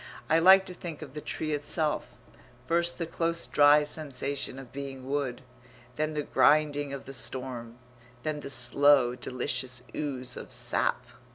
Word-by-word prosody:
I 160 Hz, -, +5 dB
like 190 Hz, +3 st, +7 dB
to 185 Hz, -, -6 dB
think 165 Hz, -3 st, -7 dB
of 135 Hz, -4 st, -11 dB
the 150 Hz, -, -6 dB
tree 155 Hz, +1 st, -3 dB
itself: 150 Hz, +1 st, -1 dB, 0.6 s
first 170 Hz, +2 st, +1 dB
the 170 Hz, -, -2 dB
close 165 Hz, +1 st, -1 dB
dry 145 Hz, +1 st, +5 dB
sensation 140 Hz, -3 st, -3 dB
of 135 Hz, -3 st, -10 dB
being 135 Hz, -2 st, -7 dB
wood; 135 Hz, -3 st, -2 dB, 0.5 s
then 155 Hz, +2 st, -2 dB
the 150 Hz, -, -1 dB
grinding 145 Hz, -1 st, +3 dB
of 140 Hz, -1 st, -7 dB
the 135 Hz, -, -8 dB
storm; 125 Hz, -3 st, -4 dB, 0.5 s
then 155 Hz, -1 st, -2 dB
the 140 Hz, -, -7 dB
slow, 130 Hz, 0 st, +4 dB
delicious 125 Hz, 0 st, -3 dB
ooze 130 Hz, -4 st, -4 dB
of -, -, -9 dB
sap. -, -, +2 dB
145 Hz, 155 wpm, -28 LUFS, 130-155 Hz, 0.6 s, like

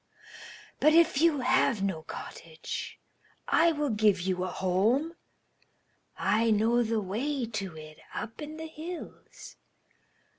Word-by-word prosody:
But 305 Hz, -, +5 dB
if 330 Hz, -4 st, +4 dB
you 320 Hz, -5 st, +3 dB
have 255 Hz, -4 st, +2 dB
no 190 Hz, -5 st, -1 dB
cottage, 160 Hz, 0 st, -7 dB, 0.5 s
I 335 Hz, 0 st, +4 dB
will 295 Hz, -4 st, -1 dB
give 210 Hz, -3 st, +3 dB
you 185 Hz, 0 st, -1 dB
a -, -, -1 dB
home. 210 Hz, -, +1 dB, 1.0 s
I 225 Hz, +2 st, +2 dB
know 225 Hz, +3 st, +3 dB
the 225 Hz, -1 st, 0 dB
way 240 Hz, +7 st, -2 dB
to 195 Hz, -7 st, -5 dB
it 155 Hz, 0 st, -11 dB
up 225 Hz, +5 st, -6 dB
in 305 Hz, +1 st, -7 dB
the 320 Hz, -, -6 dB
hills. 320 Hz, +2 st, -9 dB
230 Hz, 125 wpm, -29 LUFS, 190-295 Hz, 1.0 s, But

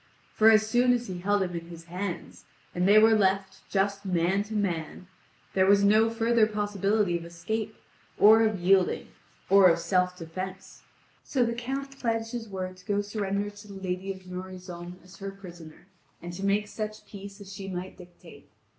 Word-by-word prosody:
For 220 Hz, +1 st, +6 dB
as 215 Hz, -1 st, +5 dB
soon 245 Hz, +3 st, +3 dB
as 245 Hz, 0 st, -1 dB
he 185 Hz, -4 st, -6 dB
held 205 Hz, +2 st, +1 dB
him 180 Hz, -1 st, -4 dB
in 170 Hz, -1 st, -6 dB
his 170 Hz, -1 st, -10 dB
hands, 180 Hz, +2 st, -6 dB, 0.3 s
and 180 Hz, +1 st, +1 dB
they 205 Hz, +2 st, +7 dB
were 220 Hz, +1 st, +7 dB
left 195 Hz, -2 st, +1 dB
just 200 Hz, 0 st, 0 dB
man 185 Hz, +1 st, +1 dB
to 215 Hz, +1 st, -7 dB
man, 180 Hz, -4 st, -2 dB, 0.5 s
there 190 Hz, 0 st, +3 dB
was 200 Hz, 0 st, +5 dB
no 215 Hz, +2 st, +5 dB
further 230 Hz, -1 st, +2 dB
possibility 205 Hz, -2 st, 0 dB
of -, -, -10 dB
escape, 205 Hz, +6 st, -4 dB, 0.4 s
or 220 Hz, +2 st, +7 dB
of 215 Hz, -3 st, +1 dB
yielding, 185 Hz, +1 st, +2 dB, 0.4 s
or 195 Hz, -1 st, +7 dB
of 165 Hz, -, +3 dB
self 180 Hz, +1 st, 0 dB
defence; 185 Hz, +3 st, -7 dB, 0.4 s
so 255 Hz, -4 st, +1 dB
the 235 Hz, -, -1 dB
Count 270 Hz, +3 st, -5 dB
pledged 225 Hz, -1 st, -1 dB
his 230 Hz, -3 st, -5 dB
word 185 Hz, -1 st, -5 dB
to 185 Hz, -, -18 dB
go 205 Hz, -, +1 dB
to 205 Hz, -, +1 dB
surrender 205 Hz, -1 st, -2 dB
to 205 Hz, +1 st, -14 dB
the 200 Hz, -, -10 dB
lady 190 Hz, 0 st, -3 dB
of 190 Hz, -1 st, -8 dB
Noroison 180 Hz, -1 st, -8 dB
as 180 Hz, +1 st, -15 dB
her 195 Hz, -1 st, -5 dB
prisoner, 175 Hz, -5 st, -12 dB, 0.3 s
and 175 Hz, 0 st, -8 dB
to 190 Hz, +3 st, -7 dB
make 205 Hz, +1 st, +1 dB
such 215 Hz, 0 st, -6 dB
peace 200 Hz, 0 st, -10 dB
as 200 Hz, -1 st, -10 dB
she 195 Hz, -1 st, -7 dB
might 185 Hz, 0 st, -5 dB
dictate. 180 Hz, -1 st, -15 dB
195 Hz, 190 wpm, -27 LUFS, 180-215 Hz, 0.5 s, they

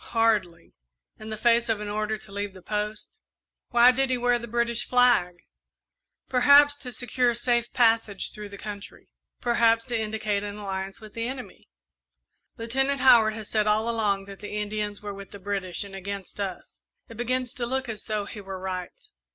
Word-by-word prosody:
"Hardly, 210 Hz, -7 st, +1 dB, 0.5 s
in 215 Hz, -, -8 dB
the 215 Hz, -, -4 dB
face 235 Hz, +1 st, +3 dB
of 220 Hz, -2 st, +1 dB
an 210 Hz, -, -5 dB
order 215 Hz, +1 st, -2 dB
to 215 Hz, -, -13 dB
leave 200 Hz, 0 st, -4 dB
the 185 Hz, -, -13 dB
post." 210 Hz, +1 st, -4 dB, 0.5 s
"Why 240 Hz, 0 st, +7 dB
did 270 Hz, +1 st, 0 dB
he 255 Hz, -, +1 dB
wear 245 Hz, 0 st, +2 dB
the 235 Hz, -, -7 dB
British 235 Hz, +1 st, +1 dB
flag?" 245 Hz, -8 st, +4 dB, 0.9 s
"Perhaps 285 Hz, +3 st, +6 dB
to 255 Hz, -3 st, -8 dB
secure 245 Hz, 0 st, 0 dB
safe 240 Hz, 0 st, 0 dB
passage 225 Hz, -4 st, +2 dB
through 210 Hz, -1 st, -8 dB
the 200 Hz, -, -9 dB
country; 205 Hz, 0 st, -9 dB, 0.3 s
perhaps 230 Hz, -1 st, +3 dB
to 245 Hz, -2 st, -3 dB
indicate 215 Hz, -2 st, -1 dB
an 205 Hz, 0 st, -5 dB
alliance 195 Hz, -1 st, -5 dB
with 215 Hz, -1 st, -12 dB
the 230 Hz, 0 st, -3 dB
enemy." 255 Hz, 0 st, -8 dB, 0.9 s
"Lieutenant 270 Hz, +4 st, 0 dB
Howard 225 Hz, -4 st, +6 dB
has 220 Hz, -2 st, -6 dB
said 215 Hz, -1 st, +2 dB
all 215 Hz, +2 st, +2 dB
along 210 Hz, -4 st, +1 dB
that 195 Hz, -1 st, -11 dB
the 210 Hz, 0 st, -7 dB
Indians 210 Hz, 0 st, -3 dB
were 205 Hz, -1 st, -5 dB
with 200 Hz, -1 st, -10 dB
the 200 Hz, -, -10 dB
British 195 Hz, -2 st, -2 dB
and 200 Hz, -1 st, -10 dB
against 195 Hz, +1 st, -7 dB
us. 195 Hz, -3 st, -6 dB, 0.3 s
It 230 Hz, -, -11 dB
begins 250 Hz, +2 st, -1 dB
to 240 Hz, -2 st, -3 dB
look 265 Hz, +1 st, -2 dB
as 220 Hz, -2 st, -6 dB
though 215 Hz, -2 st, -2 dB
he 205 Hz, +1 st, -8 dB
were 195 Hz, -1 st, -7 dB
right." 185 Hz, -1 st, -6 dB
215 Hz, 185 wpm, -26 LUFS, 205-240 Hz, 0.9 s, Why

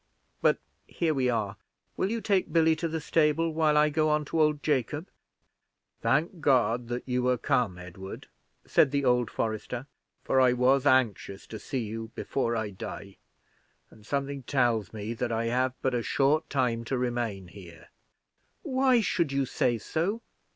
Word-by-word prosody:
But -, -, +4 dB, 0.3 s
here 165 Hz, -2 st, 0 dB
we 130 Hz, -3 st, +1 dB
are: 110 Hz, -4 st, -1 dB, 0.4 s
will 190 Hz, -, 0 dB
you 230 Hz, +1 st, -2 dB
take 195 Hz, -4 st, +1 dB
Billy 160 Hz, -1 st, +4 dB
to 165 Hz, -, -1 dB
the 160 Hz, 0 st, -3 dB
stable, 160 Hz, +1 st, +1 dB
while 155 Hz, -1 st, +3 dB
I 150 Hz, 0 st, +5 dB
go 155 Hz, +1 st, +1 dB
on 150 Hz, 0 st, +1 dB
to 160 Hz, +2 st, 0 dB
old 150 Hz, -1 st, +2 dB
Jacob? 145 Hz, -, -1 dB, 0.9 s
"Thank 155 Hz, +10 st, +1 dB
God 125 Hz, -4 st, +2 dB
that 120 Hz, +2 st, -4 dB
you 125 Hz, 0 st, 0 dB
are 125 Hz, -1 st, +3 dB
come, 110 Hz, -6 st, 0 dB
Edward," 90 Hz, +2 st, -9 dB, 0.4 s
said 135 Hz, -, +4 dB
the 140 Hz, 0 st, 0 dB
old 125 Hz, -2 st, +3 dB
forester, 115 Hz, +3 st, -3 dB, 0.4 s
"for 130 Hz, -, +3 dB
I 125 Hz, -1 st, +5 dB
was 130 Hz, +3 st, +3 dB
anxious 120 Hz, -7 st, +1 dB
to 110 Hz, -, -8 dB
see 130 Hz, +3 st, -3 dB
you 110 Hz, +1 st, -6 dB
before 120 Hz, -4 st, -1 dB
I 110 Hz, -2 st, -2 dB
die; 100 Hz, +1 st, -8 dB, 0.7 s
and 110 Hz, -, -17 dB
something 140 Hz, +3 st, -3 dB
tells 120 Hz, -5 st, +1 dB
me 110 Hz, +1 st, -5 dB
that 120 Hz, +1 st, -3 dB
I 115 Hz, 0 st, 0 dB
have 125 Hz, +2 st, 0 dB
but 130 Hz, -, +1 dB
a 120 Hz, -, 0 dB
short 140 Hz, +6 st, +1 dB
time 125 Hz, -4 st, 0 dB
to 130 Hz, +3 st, -1 dB
remain 120 Hz, -7 st, -2 dB
here." 85 Hz, -4 st, -13 dB, 0.7 s
"Why 260 Hz, -2 st, +3 dB
should 170 Hz, -7 st, 0 dB
you 140 Hz, 0 st, +1 dB
say 120 Hz, -1 st, 0 dB
so! 175 Hz, -, -2 dB
130 Hz, 170 wpm, -28 LUFS, 115-150 Hz, 0.9 s, I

